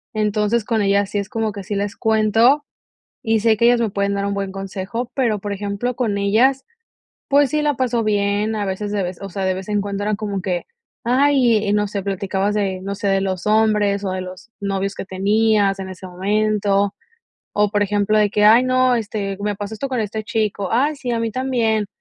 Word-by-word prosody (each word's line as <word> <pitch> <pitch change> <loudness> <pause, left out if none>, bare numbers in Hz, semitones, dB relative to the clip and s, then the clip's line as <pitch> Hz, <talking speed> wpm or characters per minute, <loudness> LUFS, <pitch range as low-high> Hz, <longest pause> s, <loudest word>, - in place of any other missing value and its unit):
Entonces, 210 +1 +1
con 225 -1 0
ellas 200 0 +1
sí 205 - 0
es 200 0 -5
como 220 -1 -1
que 200 -1 -7
sí 205 +2 -4
les 200 +1 -2
cuento, 225 +6 +3 0.6
y 225 -1 +2
sé 220 0 +3
que 235 - +3
ellas 240 0 +4
me 225 -2 0
pueden 200 0 -1
dar 200 0 -1
un 200 - -1
buen 200 -1 -3
consejo, 195 +5 -5
pero, 235 -6 +1
por 205 +1 -4
ejemplo, 205 +5 -3
con 225 -5 0
ellas, 235 +7 +2 0.6
pues, 285 -1 +4
sí 305 0 0
la 295 -1 +1
paso 245 -2 0
bien, 205 +1 +1
a 210 - -1
veces 195 +2 -3
de 205 -1 0
vez, 180 0 -6
o 195 - -5
sea, 195 +1 -3
de 190 0 +1
vez 190 +1 -7
en 210 -1 +1
cuando 200 0 -4
eran 210 0 0
como 205 -2 -3
que: 180 -2 -2 0.4
"Ay", 245 -5 +3
no 210 0 +2
sé, 200 -1 -4
platicabas 195 +1 -1
de, 190 -3 -1
no 200 +1 -4
sé, 205 - -4
de 195 0 +2
los 190 -1 -3
hombres, 210 -2 +2
o 190 - -1
de 185 - -3
los 185 +4 -10
novios 195 0 -2
que - - -5
tenías 200 +1 +2
en 190 - -5
ese 185 0 -9
momento, 200 +1 +1 0.6
o 210 -1 +2
por 205 -1 +1
ejemplo, 205 +1 +1
de 210 -1 +3
que: 210 0 +2
"Ay 225 +4 +7
no, 255 0 +3
este, 205 -3 -3
me 205 0 -2
pasó 205 +2 -5
esto 275 +6 -4
con 255 -2 -2
este 215 0 -3
chico, 210 -3 -1
ay 280 +7 +2
sí, 255 -3 -5
a 230 - 0
mí 230 0 -1
también", 230 -5 0
210 Hz, 220 wpm, -20 LUFS, 200-225 Hz, 0.6 s, Ay